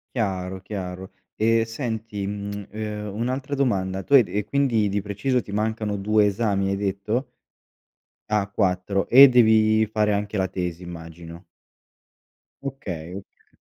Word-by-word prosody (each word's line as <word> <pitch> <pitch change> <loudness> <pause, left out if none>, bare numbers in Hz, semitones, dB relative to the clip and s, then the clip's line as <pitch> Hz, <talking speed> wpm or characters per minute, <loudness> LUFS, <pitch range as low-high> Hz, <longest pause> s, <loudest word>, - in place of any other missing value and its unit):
Chiaro, 95 -4 -2
chiaro 95 -1 -6 0.3
e 115 +1 +3
senti, 110 -4 -4
mhmm, 100 0 -5
ehm, 105 -1 -5
un'altra 130 +5 -2
domanda. 95 -9 0
Tu 140 - -1
hai 135 - +9
d - - -14
e 105 0 0
quindi 120 -4 +1
di 100 0 -1
preciso 105 +6 -1
ti 100 - -10
mancano 110 0 -1
2 105 +1 +3
esami 100 -1 0
hai 100 - 0
detto? 100 +6 -2 1.0
Ah, 105 -2 +1
4, 95 -1 0
e 135 +3 +10
devi 110 -2 +4
fare 105 0 +1
anche 105 +1 -2
la 95 -1 +1
tesi 90 -1 -4
immagino. 85 0 -10 1.2
Okay, 90 - -6
ok 100 0 -13
105 Hz, 140 wpm, -24 LUFS, 95-110 Hz, 1.2 s, e